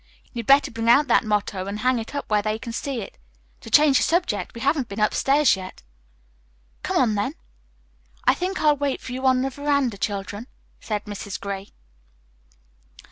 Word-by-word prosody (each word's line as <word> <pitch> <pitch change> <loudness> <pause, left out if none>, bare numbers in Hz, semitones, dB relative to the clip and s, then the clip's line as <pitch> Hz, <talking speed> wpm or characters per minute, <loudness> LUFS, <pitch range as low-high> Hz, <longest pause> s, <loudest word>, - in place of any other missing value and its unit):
You'd 235 -3 -5
better 275 +1 +5
bring 230 0 -1
out 280 +5 +6
that - - +4
motto 205 -3 -1
and 200 +1 -4
hang 255 0 +2
it 225 +5 -7
up 285 - -4
where 210 -1 +2
they 215 +1 -1
can 230 0 -7
see 265 0 -3
it. - - -10 0.4
To - - -11
change 295 -3 +5
the - - +2
subject, 335 - 0
we 230 - -7
haven't 270 -1 +1
been 200 - -6
upstairs 270 +7 +3
yet." 185 - -10 1.0
"Come - - -1
on, 235 -4 +3
then." 210 +9 -2 0.9
"I - - +6
think 370 +2 -3
I'll 300 -1 +4
wait 280 -1 -2
for - - -9
you 260 +1 -1
on 255 0 +3
the 270 - -2
veranda, 280 -6 0
children," 205 +3 -4 0.3
said 210 -1 -4
Mrs. 205 -2 -6
Gray. 200 0 -5
235 Hz, 185 wpm, -23 LUFS, 210-280 Hz, 1.0 s, out